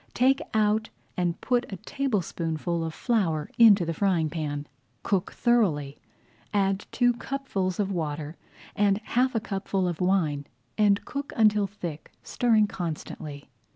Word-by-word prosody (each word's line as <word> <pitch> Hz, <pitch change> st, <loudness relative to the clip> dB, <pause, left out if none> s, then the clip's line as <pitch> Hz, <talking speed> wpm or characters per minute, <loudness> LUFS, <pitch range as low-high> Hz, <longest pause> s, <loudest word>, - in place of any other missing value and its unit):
Take 265 Hz, +2 st, +3 dB
out 215 Hz, +1 st, +2 dB, 0.3 s
and 175 Hz, -2 st, -1 dB
put 245 Hz, -3 st, 0 dB
a -, -, -3 dB
tablespoonful 175 Hz, -, -2 dB
of 160 Hz, -, -3 dB
flour 165 Hz, -, 0 dB
into 205 Hz, -6 st, +7 dB
the 165 Hz, -, -2 dB
frying 170 Hz, -4 st, +1 dB
pan. 150 Hz, -3 st, -3 dB, 0.4 s
Cook 190 Hz, -3 st, 0 dB
thoroughly, 170 Hz, -, +1 dB, 0.6 s
add 195 Hz, 0 st, +1 dB
two 245 Hz, -1 st, +3 dB
cupfuls 235 Hz, -8 st, -3 dB
of 200 Hz, -1 st, 0 dB
water 155 Hz, -3 st, -3 dB, 0.4 s
and 200 Hz, -2 st, +3 dB
half 250 Hz, +3 st, +1 dB
a -, -, +3 dB
cupful 195 Hz, -2 st, -2 dB
of 175 Hz, -1 st, -3 dB
wine, 160 Hz, -7 st, +1 dB, 0.3 s
and 205 Hz, -1 st, +3 dB
cook 280 Hz, 0 st, -5 dB
until 210 Hz, -2 st, +4 dB
thick, 175 Hz, -6 st, -7 dB
stirring 225 Hz, -3 st, +3 dB
constantly. 155 Hz, -6 st, -6 dB
195 Hz, 135 wpm, -27 LUFS, 165-220 Hz, 0.6 s, into